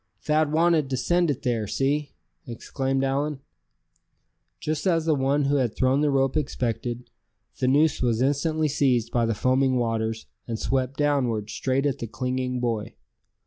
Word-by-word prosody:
"Thad 155 0 +1
wanted 160 -3 +2
to 130 - -1
send 175 +6 +1
it 140 - -2
there; 115 -4 -1
see!" 140 +5 -1 0.3
exclaimed 135 +3 -2
Allan. 140 +1 -1 1.2
Just 155 - -2
as 165 -3 +2
the 160 - +3
one 140 +1 +1
who 140 +1 +2
had 125 -5 0
thrown 130 +2 +2
the 150 - +2
rope 135 0 +1
expected, 120 -4 -3 0.5
the 130 - +1
noose 145 +3 +3
was 120 -3 +1
instantly 155 +4 +1
seized 130 -5 +1
by 120 -2 +1
the 115 - 0
foaming 130 +3 +2
waters, 115 -2 -1 0.2
and 115 -2 -3
swept 130 +2 -1
downward, 125 -8 0
straight 135 +1 -1
at 140 -1 0
the 115 - -4
clinging 125 +1 -2
boy. 115 -3 -2
135 Hz, 160 wpm, -25 LUFS, 120-145 Hz, 1.2 s, the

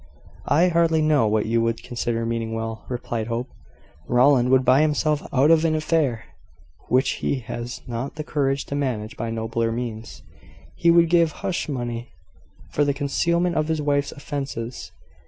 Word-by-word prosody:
"I 170 +5 +4
hardly 165 -2 +2
know 150 -7 +3
what 105 0 +1
you 115 +1 +1
would 115 0 -1
consider 120 -2 -2
meaning 115 -1 -2
well," 115 -1 -5
replied 120 -3 -3
Hope. 120 +2 -3 0.6
"Rowland 125 0 +4
would 130 0 +4
buy 130 +3 +5
himself 150 0 +1
out 140 +4 +4
of 165 -1 +5
an 160 -1 +2
affair 155 -7 0 0.6
which 130 +1 +1
he 135 - -1
has 120 0 -6
not 120 +3 -5
the 155 - -4
courage 140 -2 -1
to 140 - -5
manage 120 -6 -2
by 115 +1 -4
nobler 115 0 -1
means. 115 -1 -6 0.5
He 170 - +2
would 170 0 +6
give 170 -2 +4
hush 175 - -2
money 120 -3 -4 0.6
for 145 - +2
the 140 -1 0
concealment 170 +5 0
of 155 0 +1
his 160 -1 0
wife's 145 -1 0
offences. 135 -5 -6
130 Hz, 165 wpm, -23 LUFS, 115-155 Hz, 0.6 s, would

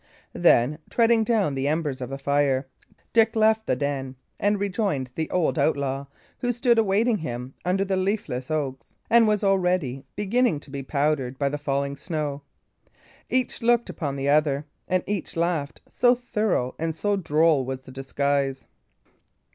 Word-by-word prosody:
Then, 135 +6 +3
treading 230 -1 +3
down 215 - +1
the 135 +1 -1
embers 150 -3 -1
of 125 - -4
the 135 - -4
fire, 140 -1 +1 0.5
Dick 225 -1 +4
left 220 0 +3
the - - +2
den, 135 -1 -3 0.2
and 205 0 +1
rejoined 190 - -1
the 160 +2 -3
old 170 -3 +1
outlaw, 140 -1 0 0.3
who 245 - 0
stood 240 -1 +3
awaiting 215 +2 +2
him 125 -4 -5
under 190 +2 +1
the 190 -1 0
leafless 185 - -2
oaks, 140 -4 -3 0.2
and 230 -1 +6
was 210 -1 +1
already 180 -9 +1
beginning 210 - +1
to 140 - -14
be 140 -1 -4
powdered 140 -2 -1
by 140 0 +1
the 145 +1 -4
falling 140 -1 -1
snow. 145 -1 -3 0.9
Each 255 -1 0
looked 235 0 +2
upon 145 -4 -4
the 135 0 -2
other, 145 -1 +2 0.2
and 185 -1 +1
each 200 -4 -3
laughed, 165 -4 -1
so 245 0 +3
thorough 215 - -1
and 160 0 -2
so 205 +5 0
droll 160 -5 +2
was 130 0 -5
the 130 - -12
disguise. 135 0 -1
155 Hz, 160 wpm, -25 LUFS, 140-205 Hz, 0.9 s, and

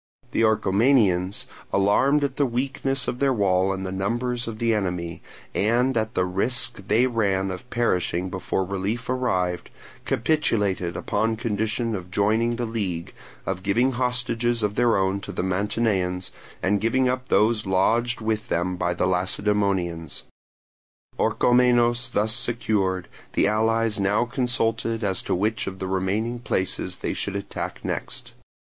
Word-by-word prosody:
The - - +1
Orchomenians, 105 -3 +3 0.3
alarmed 130 +9 +3
at 135 -2 -2
the 145 - +3
weakness 135 +2 -1
of 125 - -2
their 140 -1 +3
wall 95 -4 +2
and 95 0 -3
the 95 - -4
numbers 120 +6 -1
of 115 -2 -5
the 115 0 +1
enemy, 90 -5 -2 0.3
and 120 +5 +2
at 110 -1 -1
the 90 - +2
risk 100 +1 0
they 115 +4 +4
ran 100 -6 0
of 105 +7 -8
perishing 90 -6 0
before 95 +1 -1
relief 100 +6 -2
arrived, 90 -9 -1 0.4
capitulated 105 - 0
upon 110 0 0
condition 110 0 -1
of 90 -2 -7
joining 110 +5 +1
the 120 0 -2
league, 100 -7 -3 0.3
of 95 -1 -2
giving 115 +7 +2
hostages 120 -2 0
of 105 -1 +1
their 120 -1 +3
own 95 0 +1
to 100 - -7
the 90 - -3
Mantineans, 95 -1 0 0.3
and 100 +1 +2
giving 130 +4 +2
up 130 0 -1
those 110 -2 +2
lodged 115 +6 +2
with 110 -1 -1
them 90 +2 0
by 85 0 0
the 90 - +1
Lacedaemonians. 95 -2 0 1.0
Orchomenos 120 0 +3
thus 110 -1 +1
secured, 105 -6 0 0.3
the - - +3
allies 110 0 +2
now 100 +4 +2
consulted 115 -2 -1
as 95 -3 +1
to - - -1
which 110 +5 0
of 95 0 -5
the 95 - -4
remaining 100 +6 -1
places 95 -5 -1
they - - -3
should 100 - -3
attack 100 - -5
next. - - -4
105 Hz, 145 wpm, -24 LUFS, 95-120 Hz, 1.0 s, they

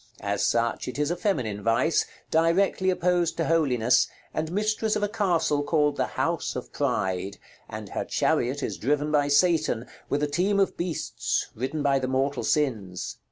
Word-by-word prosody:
As 100 0 -1
such, 115 0 0
it 125 - -5
is 150 +2 0
a - - 0
feminine 130 - -1
vice, 115 +9 +2 0.2
directly 180 +4 +2
opposed 180 -2 +1
to 165 - 0
Holiness, 130 -8 +3 0.3
and 155 +1 -2
mistress 215 +2 0
of 210 - -1
a - - +2
castle 180 -8 +1
called 150 -1 +1
the - - 0
House - - -1
of - - -6
Pryde, 95 +1 -1 0.3
and - - -7
her - - -3
chariot 130 +4 0
is - - -3
driven 145 +4 0
by 145 -1 +3
Satan, 150 -5 +2 0.2
with 145 +1 0
a - - +2
team 190 +7 +1
of 195 - +2
beasts, 175 -1 -2
ridden 135 +6 -3
by 140 -1 +3
the 130 - -2
mortal 135 +1 0
sins. 110 -12 -1
150 Hz, 170 wpm, -26 LUFS, 125-175 Hz, 0.3 s, Holiness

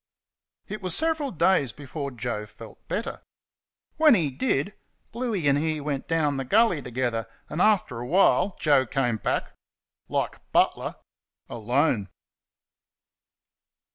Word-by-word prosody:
It 210 0 -6
was 185 -3 -1
several 320 -3 0
days 170 - +2
before 145 0 -6
Joe 115 -4 -4
felt 105 +2 -14
better. 220 - -3 0.8
When 310 -5 +7
he 160 -8 0
did, 195 - -1 0.4
Bluey 225 - -2
and 140 0 +4
he 155 0 -1
went 145 -2 -3
down 150 -4 +1
the 135 - -2
gully 205 - +3
together, 120 -3 -2 0.2
and, 155 - -2
after 195 - +2
a 120 - -5
while, 185 +3 +3
Joe 145 -4 +3
came 130 -5 0
back - - -2 0.6
like - - -2
Butler - - +2 0.5
alone. 120 - 0
145 Hz, 125 wpm, -26 LUFS, 125-195 Hz, 0.8 s, When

